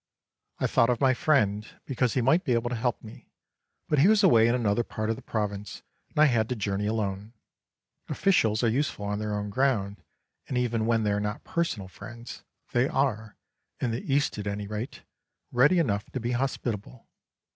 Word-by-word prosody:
I -, -, -1 dB
thought 115 Hz, -, +3 dB
of 120 Hz, -, +1 dB
my 130 Hz, -2 st, +4 dB
friend, 110 Hz, -7 st, +1 dB, 0.2 s
because 125 Hz, -3 st, 0 dB
he 130 Hz, -, +2 dB
might 160 Hz, +8 st, +3 dB
be 125 Hz, -, +1 dB
able 120 Hz, +1 st, 0 dB
to -, -, -1 dB
help 120 Hz, +1 st, -1 dB
me, 110 Hz, 0 st, -13 dB, 0.6 s
but 150 Hz, -, +2 dB
he 155 Hz, -, +6 dB
was 215 Hz, 0 st, +4 dB
away 115 Hz, -12 st, +6 dB
in 120 Hz, -, +3 dB
another 115 Hz, -1 st, +1 dB
part 110 Hz, 0 st, -3 dB
of -, -, -1 dB
the -, -, -11 dB
province 105 Hz, -2 st, -4 dB, 0.3 s
and -, -, -18 dB
I 155 Hz, -, +7 dB
had 115 Hz, -6 st, +2 dB
to 125 Hz, -, -1 dB
journey 100 Hz, -1 st, -2 dB
alone. 105 Hz, 0 st, -2 dB, 0.8 s
Officials 115 Hz, -, +2 dB
are -, -, +4 dB
useful 115 Hz, -3 st, -1 dB
on 105 Hz, 0 st, -2 dB
their 105 Hz, -1 st, -2 dB
own 105 Hz, 0 st, -3 dB
ground, 110 Hz, -6 st, 0 dB, 0.5 s
and 130 Hz, -, -2 dB
even 115 Hz, -2 st, 0 dB
when 115 Hz, -1 st, +2 dB
they 105 Hz, -, +1 dB
are 100 Hz, -, +1 dB
not 105 Hz, 0 st, -3 dB
personal 165 Hz, -, -2 dB
friends, 120 Hz, +5 st, -10 dB, 0.3 s
they 120 Hz, +2 st, +2 dB
are, 120 Hz, -8 st, -1 dB, 0.4 s
in 125 Hz, -, -1 dB
the 115 Hz, -, -3 dB
East 140 Hz, -5 st, +1 dB
at 105 Hz, -, -4 dB
any 100 Hz, 0 st, -3 dB
rate, 105 Hz, +4 st, -6 dB, 0.5 s
ready 140 Hz, +9 st, +4 dB
enough 105 Hz, -, 0 dB
to 130 Hz, -, -2 dB
be 120 Hz, +1 st, -2 dB
hospitable. 120 Hz, -2 st, -3 dB
115 Hz, 195 wpm, -27 LUFS, 105-130 Hz, 0.8 s, I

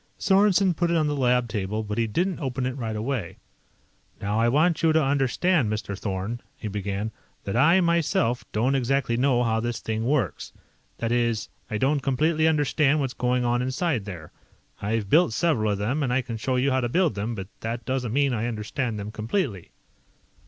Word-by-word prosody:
Sorensen 195 Hz, -1 st, +3 dB
put 175 Hz, +1 st, 0 dB
it 170 Hz, -, +2 dB
on 155 Hz, -, +2 dB
the 150 Hz, 0 st, 0 dB
lab 125 Hz, -2 st, +2 dB
table, 105 Hz, 0 st, -2 dB
but 105 Hz, +1 st, -3 dB
he 115 Hz, -, +1 dB
didn't 175 Hz, -, -1 dB
open 130 Hz, -3 st, -2 dB
it 130 Hz, 0 st, -2 dB
right 115 Hz, -5 st, -4 dB
away. 110 Hz, -4 st, -3 dB, 0.8 s
"Now 105 Hz, +2 st, -1 dB
I 115 Hz, +1 st, +3 dB
want 155 Hz, +6 st, +2 dB
you 165 Hz, -1 st, +4 dB
to 160 Hz, 0 st, +3 dB
understand, 140 Hz, -, +1 dB
Mr. 105 Hz, -2 st, -3 dB
Thorn," 100 Hz, +4 st, -4 dB, 0.2 s
he 110 Hz, -, -6 dB
began, 100 Hz, +1 st, -3 dB, 0.3 s
"that 100 Hz, -, -3 dB
I, 165 Hz, +9 st, +5 dB
myself, 165 Hz, -8 st, +1 dB
don't 120 Hz, +6 st, +1 dB
exactly 135 Hz, -2 st, +1 dB
know 125 Hz, 0 st, +2 dB
how 110 Hz, -1 st, +1 dB
this 120 Hz, 0 st, -2 dB
thing 110 Hz, 0 st, -3 dB
works. 135 Hz, +2 st, -1 dB, 0.4 s
That 115 Hz, 0 st, -2 dB
is, 120 Hz, -3 st, 0 dB, 0.2 s
I 105 Hz, -, -2 dB
don't 140 Hz, +6 st, +2 dB
completely 155 Hz, +5 st, +1 dB
understand 150 Hz, -1 st, +2 dB
what's 135 Hz, -3 st, -2 dB
going 125 Hz, 0 st, 0 dB
on 120 Hz, 0 st, +1 dB
inside 130 Hz, -, -1 dB
there. 85 Hz, -7 st, -8 dB, 0.5 s
I've 105 Hz, 0 st, -1 dB
built 155 Hz, -, +4 dB
several 115 Hz, -9 st, +1 dB
of -, -, -3 dB
them, 120 Hz, +9 st, -1 dB
and 130 Hz, -4 st, 0 dB
I 130 Hz, +1 st, +1 dB
can 115 Hz, -1 st, -5 dB
show 130 Hz, +4 st, -1 dB
you 130 Hz, +2 st, +2 dB
how 130 Hz, 0 st, +2 dB
to 120 Hz, -, -1 dB
build 175 Hz, +1 st, +2 dB
them, 105 Hz, +4 st, -3 dB
but 95 Hz, -1 st, -7 dB
that 115 Hz, +2 st, -4 dB
doesn't 130 Hz, -3 st, -2 dB
mean 140 Hz, +1 st, +2 dB
I 115 Hz, 0 st, -1 dB
understand 115 Hz, +1 st, -3 dB
them 105 Hz, +1 st, -5 dB
completely." 110 Hz, -, -2 dB
125 Hz, 195 wpm, -25 LUFS, 110-145 Hz, 0.8 s, I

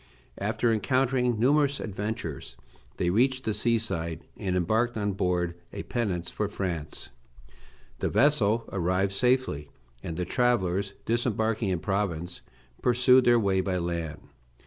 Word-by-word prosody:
After 115 Hz, -1 st, +1 dB
encountering 125 Hz, +1 st, +1 dB
numerous 140 Hz, +3 st, +3 dB
adventures 100 Hz, -, -5 dB, 0.4 s
they 85 Hz, -, +1 dB
reached 130 Hz, +5 st, +2 dB
the 110 Hz, -, -1 dB
sea 115 Hz, +3 st, +2 dB
side, 85 Hz, -7 st, -4 dB
and 95 Hz, -4 st, -2 dB
embarked 110 Hz, +7 st, +1 dB
on 105 Hz, -1 st, 0 dB
board 90 Hz, -2 st, 0 dB, 0.2 s
a -, -, -6 dB
pinnace 95 Hz, -8 st, -2 dB
for 105 Hz, -, -1 dB
France. 85 Hz, -7 st, -5 dB, 0.9 s
The -, -, 0 dB
vessel 115 Hz, -6 st, +3 dB
arrived 95 Hz, +1 st, +1 dB
safely, 125 Hz, -, +1 dB, 0.3 s
and 80 Hz, -, -5 dB
the 90 Hz, -, -1 dB
travellers, 100 Hz, -5 st, +1 dB
disembarking 115 Hz, -2 st, 0 dB
in 90 Hz, -3 st, -1 dB
Provence, 90 Hz, -3 st, -2 dB, 0.4 s
pursued 125 Hz, +1 st, +5 dB
their 120 Hz, 0 st, +6 dB
way 95 Hz, -3 st, +2 dB
by 95 Hz, -1 st, -1 dB
land. 85 Hz, -3 st, -3 dB
105 Hz, 130 wpm, -27 LUFS, 90-120 Hz, 0.9 s, their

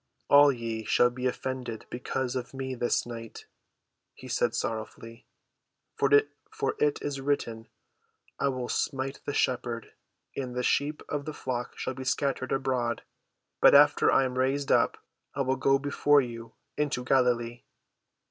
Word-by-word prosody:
"All 145 Hz, 0 st, +8 dB
ye 115 Hz, -3 st, -4 dB
shall 120 Hz, +3 st, +3 dB
be 125 Hz, +1 st, -2 dB
offended 125 Hz, -3 st, -4 dB
because 125 Hz, +1 st, -3 dB
of 130 Hz, +1 st, -5 dB
me 130 Hz, 0 st, -4 dB
this 120 Hz, -1 st, 0 dB
night," 115 Hz, -2 st, -8 dB, 0.7 s
he 130 Hz, -, -11 dB
said 120 Hz, -1 st, 0 dB
sorrowfully. 115 Hz, +1 st, -5 dB, 0.7 s
"For 430 Hz, 0 st, +4 dB, 0.5 s
it 445 Hz, -1 st, +2 dB
is 140 Hz, -2 st, -3 dB
written, 115 Hz, -5 st, -2 dB, 0.7 s
I -, -, +1 dB
will 130 Hz, -2 st, -2 dB
smite 135 Hz, +1 st, -2 dB
the 145 Hz, -, -3 dB
shepherd, 120 Hz, -2 st, -1 dB, 0.4 s
and 125 Hz, -3 st, -4 dB
the 125 Hz, -, -1 dB
sheep 145 Hz, +4 st, 0 dB
of 145 Hz, -1 st, -3 dB
the 155 Hz, -, -6 dB
flock 125 Hz, -2 st, -4 dB
shall 130 Hz, -, -3 dB
be 130 Hz, 0 st, -7 dB
scattered 130 Hz, 0 st, -1 dB
abroad. 130 Hz, -3 st, -1 dB, 0.6 s
But -, -, +8 dB
after 145 Hz, +1 st, +6 dB
I -, -, +4 dB
am 130 Hz, 0 st, -3 dB
raised 135 Hz, +2 st, 0 dB
up, -, -, +3 dB, 0.4 s
I -, -, 0 dB
will 130 Hz, 0 st, +1 dB
go 135 Hz, +1 st, +3 dB
before 145 Hz, +1 st, +3 dB
you 115 Hz, -2 st, -8 dB, 0.2 s
into 145 Hz, -4 st, -1 dB
Galilee." 120 Hz, -2 st, +1 dB
130 Hz, 145 wpm, -28 LUFS, 120-135 Hz, 0.7 s, All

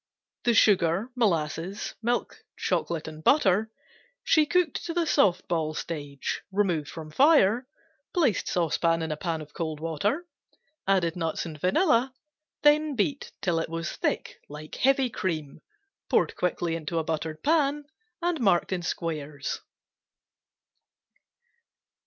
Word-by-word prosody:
The 240 Hz, -1 st, +4 dB
sugar, 195 Hz, +2 st, +3 dB
molasses, 175 Hz, -3 st, -1 dB
milk, 240 Hz, +1 st, -2 dB
chocolate 165 Hz, -2 st, -1 dB
and 155 Hz, 0 st, -9 dB
butter 220 Hz, -, +4 dB, 0.5 s
she 310 Hz, -2 st, +4 dB
cooked 360 Hz, -3 st, +1 dB
to 335 Hz, -, -4 dB
the 345 Hz, -1 st, +2 dB
soft 190 Hz, -, +3 dB
ball 160 Hz, -3 st, -1 dB
stage, 145 Hz, -5 st, -4 dB
removed 180 Hz, -7 st, 0 dB
from 155 Hz, -2 st, -8 dB
fire, 250 Hz, -, +4 dB, 0.4 s
placed 285 Hz, -, +1 dB
saucepan 165 Hz, -1 st, +1 dB
in 160 Hz, -, -3 dB
a -, -, -1 dB
pan 165 Hz, 0 st, -3 dB
of 150 Hz, -1 st, -11 dB
cold 160 Hz, -2 st, -3 dB
water, 180 Hz, -, -1 dB, 0.6 s
added 180 Hz, -4 st, +2 dB
nuts 165 Hz, -1 st, -2 dB
and 155 Hz, -3 st, -8 dB
vanilla, 255 Hz, -, +2 dB, 0.5 s
then 300 Hz, 0 st, +4 dB
beat 270 Hz, +6 st, -1 dB
till 175 Hz, -4 st, +1 dB
it 165 Hz, -, -3 dB
was 165 Hz, 0 st, -3 dB
thick -, -, -2 dB
like 150 Hz, +1 st, -9 dB
heavy 265 Hz, -1 st, +2 dB
cream, 155 Hz, -9 st, -3 dB, 0.5 s
poured -, -, +2 dB
quickly 175 Hz, -2 st, -1 dB
into 165 Hz, 0 st, -2 dB
buttered 155 Hz, 0 st, -3 dB
pan 295 Hz, -2 st, +2 dB, 0.4 s
and 345 Hz, -5 st, 0 dB
marked 195 Hz, -5 st, +3 dB
in 180 Hz, -, -2 dB
squares. 155 Hz, -4 st, -4 dB
175 Hz, 130 wpm, -27 LUFS, 160-250 Hz, 0.6 s, The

